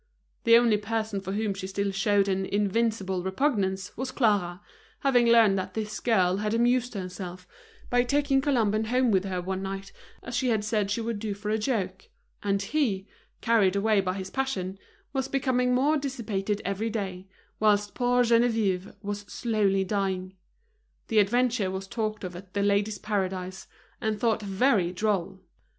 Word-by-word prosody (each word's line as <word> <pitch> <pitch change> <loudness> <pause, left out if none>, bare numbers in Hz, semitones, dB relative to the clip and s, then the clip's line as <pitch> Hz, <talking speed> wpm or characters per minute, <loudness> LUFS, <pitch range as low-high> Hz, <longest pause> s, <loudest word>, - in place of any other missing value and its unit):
The 230 0 +8
only 235 -3 +4
person 215 -1 -2
for 190 0 -4
whom 210 -1 0
she 190 -1 -6
still 200 +1 -1
showed 200 0 +2
an 190 0 0
invincible 205 -2 0
repugnance 190 -2 -1
was 260 +2 -3
Clara, 205 -9 +1 0.4
having 245 -4 +4
learned 225 -4 +5
that 185 0 -6
this 215 -1 -3
girl 190 -6 +2
had 210 +2 -1
amused 245 +1 +2
herself 180 -1 -6 0.4
by 245 0 +4
taking 275 +2 +2
Colomban 220 -6 +1
home 250 0 +2
with 190 -1 +2
her 185 -2 -2
one 190 +1 -3
night 195 0 -5 0.3
as 240 - -5
she 260 - +1
had 220 -3 +1
said 210 -2 0
she 210 +3 -1
would 225 -2 -3
do 210 -1 -3
for 210 +1 -4
a 220 - +1
joke; 195 -6 -2 0.4
and 200 -1 0
he, 205 -7 0 0.4
carried 215 -5 +3
away 205 0 +3
by 185 -1 -2
his 190 -1 -6
passion, 195 -8 -2 0.3
was 265 -1 -1
becoming 250 -2 +1
more 290 +5 +3
dissipated 215 -7 -3
every 200 +4 -1
day, 195 -4 -4 0.3
whilst 205 -1 +2
poor 245 0 +2
Geneviève 225 -5 +1
was 205 0 -3
slowly 205 -5 +1
dying. 190 -1 -2 0.8
The 220 -3 +4
adventure 235 0 +2
was 190 +1 -4
talked 215 +1 -3
of 180 -1 -5
at 185 +1 -12
The 200 - +1
Ladies' 205 +1 +1
Paradise, 190 -2 -3 0.3
and 215 -1 -1
thought 225 -1 +1
very 200 -2 +2
droll. 190 -1 -1
205 Hz, 165 wpm, -27 LUFS, 190-230 Hz, 0.8 s, The